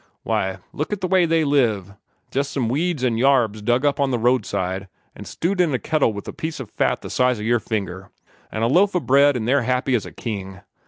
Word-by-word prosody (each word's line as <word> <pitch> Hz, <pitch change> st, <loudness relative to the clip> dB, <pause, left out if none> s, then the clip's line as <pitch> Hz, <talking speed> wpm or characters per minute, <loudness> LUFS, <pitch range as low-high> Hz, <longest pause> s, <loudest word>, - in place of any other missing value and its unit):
Why, 95 Hz, 0 st, -1 dB, 0.2 s
look 150 Hz, -, -3 dB
at 205 Hz, -1 st, -3 dB
the 185 Hz, -, 0 dB
way 180 Hz, -2 st, +3 dB
they 165 Hz, 0 st, +2 dB
live 115 Hz, -10 st, +1 dB, 0.4 s
jest 140 Hz, +1 st, -1 dB
some 125 Hz, -5 st, -1 dB
weeds 155 Hz, +2 st, -1 dB
an' 115 Hz, -3 st, +1 dB
yarbs 120 Hz, -5 st, +3 dB
dug 120 Hz, +6 st, +1 dB
up 145 Hz, 0 st, +1 dB
on 140 Hz, -1 st, +2 dB
the 125 Hz, -, 0 dB
roadside, 100 Hz, -5 st, 0 dB, 0.3 s
an' -, -, -10 dB
stewed 180 Hz, +2 st, -1 dB
in 160 Hz, -6 st, +2 dB
a -, -, +2 dB
kettle 150 Hz, 0 st, +1 dB
with 100 Hz, -1 st, -8 dB
a -, -, -5 dB
piece 160 Hz, -1 st, -5 dB
o' 130 Hz, -, -5 dB
fat -, -, -1 dB
the -, -, -6 dB
size 125 Hz, -3 st, +2 dB
o' -, -, -5 dB
your 120 Hz, +2 st, +2 dB
finger, 95 Hz, -4 st, -4 dB, 0.4 s
an' 110 Hz, -, -2 dB
a -, -, +3 dB
loaf 185 Hz, -, +3 dB
o' -, -, +3 dB
bread, 140 Hz, -1 st, +4 dB
an' 110 Hz, -, -3 dB
they're 140 Hz, +4 st, +3 dB
happy 125 Hz, +2 st, 0 dB
as 115 Hz, -5 st, 0 dB
a -, -, -10 dB
king. 95 Hz, -5 st, -6 dB
125 Hz, 235 wpm, -22 LUFS, 110-145 Hz, 0.4 s, bread